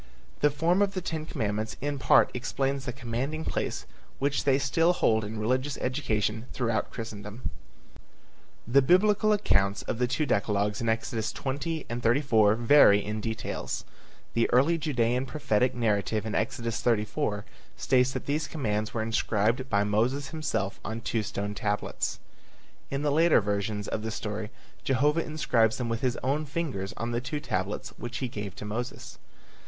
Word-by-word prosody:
The 150 - +4
form 165 +6 +2
of 200 -1 +1
the - - 0
ten 160 -3 -4
commandments 110 -4 -2
in 145 0 -2
part - - +5
explains 135 +2 -1
the 125 - -2
commanding 130 +5 -3
place - - -2 0.3
which 140 +1 0
they 135 -1 +4
still 165 +5 +3
hold 110 -10 +2
in 105 +2 -5
religious 130 +6 0
education 115 -4 -1
throughout 115 -4 0
Christendom. 110 +1 -6 1.2
The 135 +3 +5
Biblical 205 +8 +4
accounts 100 - +2
of 115 - -3
the 125 - +2
two 140 +5 0
decalogues 105 -3 0
in 115 - 0
Exodus 110 0 -1
20 145 +4 -3
and 120 +1 -4
34 115 -4 +4
vary 115 -4 +6
in 105 +1 -3
details. 110 +1 -4 0.5
The 115 - +2
early 145 +7 +4
Judean 125 -4 0
prophetic 125 -5 +1
narrative 110 -2 0
in 110 - -3
Exodus 115 0 -1
34 110 -1 0 0.3
states 125 0 +3
that - - -4
these 155 +2 -1
commands 110 -8 -2
were 110 - 0
inscribed 115 +2 0
by 100 -1 +3
Moses 120 +7 0
himself 130 -10 -2
on 110 +2 -4
two 115 0 -1
stone 100 0 -3
tablets. 105 0 -2 0.7
In 140 +1 -2
the 145 - +2
later 165 +3 +5
versions 105 0 -2
of 110 - -2
the 110 - -3
story 105 0 -4 0.3
Jehovah 145 +5 +2
inscribes 120 -8 +1
them 120 -2 -2
with 115 0 -2
his 125 -2 0
own 145 +4 0
fingers 135 - -3
on 115 +1 -2
the 120 0 -1
two 145 +4 -3
tablets 95 -8 -3
which 120 +1 -5
he 130 - -2
gave 105 -5 -6
to - - -7
Moses. 120 +4 -5
120 Hz, 160 wpm, -28 LUFS, 110-140 Hz, 1.2 s, vary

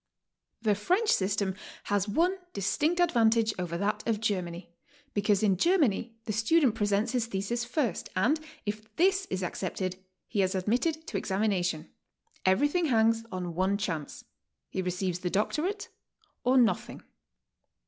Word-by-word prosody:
The 215 -2 +4
French 365 - +1
system 195 0 +1 0.3
has 205 -1 0
one 340 - +2 0.2
distinct 295 - 0
advantage 230 -9 +3
over 170 -2 -2
that 200 +3 0
of 225 -2 +1
Germany, 180 -5 -3 0.4
because 205 0 +2
in 195 -3 +3
Germany 260 - +2
the 215 - -2
student 245 +4 +3
presents 205 0 +1
his 245 -3 0
Ihesis 230 +3 -2
first, 245 - -1
and 245 +12 +2 0.3
if 215 +1 -5
this 385 +2 +3
is 190 0 -2
accepted, 185 +1 -3 0.3
he 205 - 0
is 190 +1 +1
admitted 250 - 0
to - - -3
exami 205 +3 0
nation. 175 -5 -1 0.6
Everything 290 - +3
hangs 225 -4 +3
on 180 -2 -4
one 190 +3 +1
chance. 165 -8 -4 0.5
He 190 - -1
receives 180 0 -2
the 180 - -2
doctorate 330 - -1 0.5
or 255 +2 +4
nothing. 235 -3 +1
210 Hz, 140 wpm, -29 LUFS, 190-250 Hz, 0.6 s, The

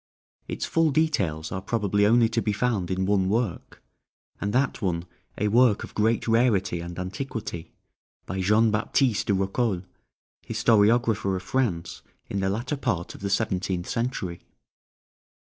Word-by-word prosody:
Its - - -3
full 165 -1 +2
details 100 - 0
are 95 - -3
probably 105 -2 +1
only 115 +1 +5
to 115 +1 -1
be 105 - 0
found 105 -4 0
in 95 0 0
one 95 -1 +2
work, 110 -3 -2 0.6
and 100 - -1
that 130 +2 0
one 85 -4 -1 0.3
a 105 - +1
work 115 0 +4
of - - -9
great 110 +2 +1
rarity 115 -6 +2
and 85 0 -7
antiquity, 95 -3 -5 0.5
by 95 +1 -3
Jean 105 +4 +4
Baptiste 115 +2 +1
de 100 - +3
Rocoles, 95 0 0 0.6
historiographer 110 -2 +2
of 95 - -5
France 95 -6 -1 0.3
in 100 - -1
the 95 0 0
latter 120 +8 -2
part 85 -10 -2
of - - -12
the 100 - -2
seventeenth 95 -3 -1
century. 115 -8 -3
105 Hz, 145 wpm, -26 LUFS, 95-115 Hz, 0.6 s, only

